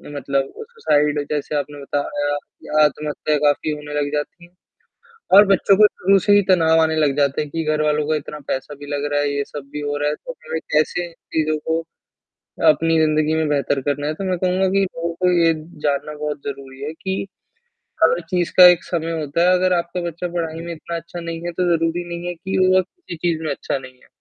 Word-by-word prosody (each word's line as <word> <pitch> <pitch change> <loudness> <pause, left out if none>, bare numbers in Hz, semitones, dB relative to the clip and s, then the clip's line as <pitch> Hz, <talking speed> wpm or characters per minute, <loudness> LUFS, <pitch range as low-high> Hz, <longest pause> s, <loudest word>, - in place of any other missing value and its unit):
मतलब 140 0 -1 0.2
सुसाइड, 150 - +1
जैसे 150 0 -2
आपने 145 0 -3
बताया 145 +1 -2 0.3
या 155 0 +3
आत्महत्या 150 0 -1
काफ़ी 145 +1 +2
होने 150 0 -6
लग 145 - -2
जाती 150 +4 -4
हैं 175 - -23 0.8
और 205 - +9
बच्चों 195 0 +4
को 210 0 +8
शुरू 195 0 +2
से 205 - +4
ही 205 - +6
तनाव 165 -3 +4
आने 160 0 +2
लग 145 -3 +2
जाते 140 0 +2
हैं 150 - -5
कि 165 -1 -2
घरवालों 150 -1 +1
का 155 - +1
इतना 150 0 -6
पैसा 135 +2 -3
भी 145 +1 -11
लग 145 0 -2
रहा 145 - +2
है, 145 - 0
ये 140 - 0
सब 140 -2 -9
भी 150 - -4
हो 145 0 -2
रहा 145 0 0
है, 150 - -2
तो - - -9 0.2
मैं - - 0
कैसे 170 +3 +1
चीज़ों 155 -1 -2
को 160 0 +1 0.9
अपनी 165 +1 +3
ज़िंदगी 155 0 +2
में 160 -1 +1
बेहतर 140 -1 0
करना 145 +1 -2
है, 155 - -1
तो 195 - -6
मैं 180 - 0
कहूँगा 185 +1 +1
कि 195 +1 +2
लोगों 170 -2 -3
को 180 +1 +1
ये 170 -2 +4 0.3
जानना 145 +1 -1
बहुत 150 0 -3
ज़रूरी 135 -1 -8
है 155 +2 -4
कि 190 0 -2 0.8
हर 165 +1 +4
चीज़ 180 -2 0
का 180 - +11
एक 175 -1 +5
समय 165 -1 -3
होता 150 +4 +1
है, - - +5
अगर 185 0 +2
आपका 170 +1 -3
बच्चा 175 +2 -5
पढ़ाई 165 -2 -3
में 170 - -4
इतना 170 +1 -7
अच्छा 170 +1 -8
नहीं 165 -1 -5
है, 175 - -2
तो 180 +1 -1
ज़रूरी 165 +2 -1
नहीं 170 +1 -5
है 175 - -2
कि 190 +3 -3
वो 185 0 +5
किसी 270 - -11
चीज़ 165 -1 -1
में 155 - -1
अच्छा 140 - -2
नहीं 130 -1 -12
है। - - -22
155 Hz, 220 wpm, -21 LUFS, 145-175 Hz, 0.9 s, का